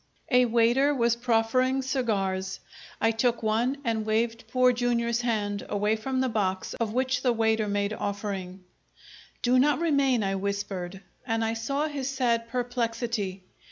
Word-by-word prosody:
A 250 0 +6
waiter 240 +5 +3
was 235 -2 +2
proffering 250 +3 +1
cigars. 195 -8 -1 0.4
I 225 - +3
took 230 +1 0
one, 230 +5 +1
and 225 -3 0
waved 225 +1 -1
Poor 250 +1 +3
Jr.'s 235 -1 0
hand 205 -4 -1
away 210 +1 +1
from 260 +4 -2
the 260 - +1
box 195 -5 -1
of 230 -2 -2
which 255 +1 0
the 250 - +2
waiter 220 -2 +1
made 205 0 0
offering. 195 -3 -4 0.8
"Do 250 +1 +4
not 295 +3 +4
remain!" 280 -8 +2
I 195 0 0
whispered, 195 -2 -3 0.3
and 225 0 0
I 225 - 0
saw 275 +6 -1
his 280 -3 -3
sad 240 -4 0
perplexity. 230 -5 -2
230 Hz, 150 wpm, -27 LUFS, 210-250 Hz, 0.8 s, A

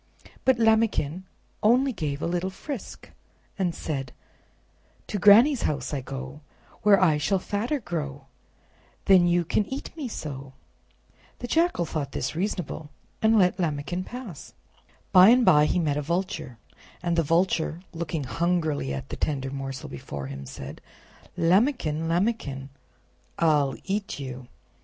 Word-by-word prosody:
But 260 -2 +4
Lambikin 220 -7 +2 0.4
only 250 +5 +4
gave 150 -6 -3
a - - +1
little 175 +2 -1
frisk 245 +5 -8 0.5
and 180 -3 0
said: 135 -5 -4 0.9
"To 205 - -3
Granny's 230 +8 +7
house 140 -2 -2
I 140 - -1
go, 135 +2 -7 0.4
Where 205 -2 +6
I 160 -5 +3
shall 190 +7 +1
fatter 215 +10 -2
grow, 145 - -5 0.8
Then 185 -3 +6
you 175 0 +2
can 210 - +1
eat 270 +4 -6
me 300 -5 -4
so." 140 - -7 0.8
The - - -6
Jackal 325 - +2
thought 145 -3 -4
this - - -3
reasonable, 175 -4 -3 0.3
and 220 0 +4
let 185 -1 +3
Lambikin 165 +2 -2
pass. 235 - -9 0.6
By 185 +2 +9
and 245 +1 +5
by 150 0 +6
he - - 0
met 150 -4 +1
a - - 0
Vulture, 170 -6 -3 0.5
and 170 -1 +1
the 165 - +3
Vulture, 165 0 +1
looking 165 -2 -3
hungrily 160 - 0
at 65 - -7
the - - -4
tender 135 -3 -2
morsel 135 -1 -5
before 70 0 -7
him, 70 0 -7
said: 70 +1 -8 0.6
"Lambikin! 170 - +2
Lambikin! 165 - -1 0.7
I'll 150 -5 +2
EAT 200 +1 -3
YOU!" 130 -2 -7
170 Hz, 140 wpm, -26 LUFS, 145-200 Hz, 0.9 s, By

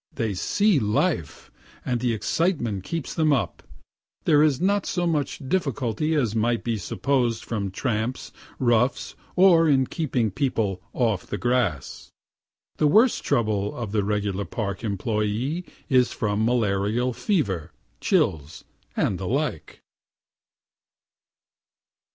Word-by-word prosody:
They 115 -5 -1
see 200 - +2
life, 105 - -1 0.3
and 125 -2 0
the 125 0 0
excitement 115 - -1
keeps 165 - -4
them 155 -2 +2
up. 135 -4 0 0.6
There 150 -1 +4
is 150 -4 +3
not 200 +2 +1
so 175 -1 -1
much 150 -5 -1
difficulty 150 - 0
as 120 -8 +1
might 115 +1 +1
be 115 -2 -1
supposed 120 +2 -1
from 105 -4 -2
tramps, 110 +4 -3 0.3
roughs, 120 +1 +1 0.2
or 175 -3 +6
in 135 -2 +4
keeping 125 - -1
people 105 -6 -1
"off 110 -7 0
the 105 - -3
grass." 120 - -1 0.7
The 150 - +3
worst 220 - +4
trouble 105 -6 0
of 115 -5 -5
the 105 -1 +1
regular 100 -1 -1
Park 100 +1 -4
employé 110 - -2 0.2
is 125 -3 +3
from 105 -1 -1
malarial 115 +1 +1
fever, 100 - -1 0.3
chills, 75 0 0 0.3
and 90 - 0
the 95 - -4
like. 135 - -3
120 Hz, 120 wpm, -24 LUFS, 105-145 Hz, 0.7 s, or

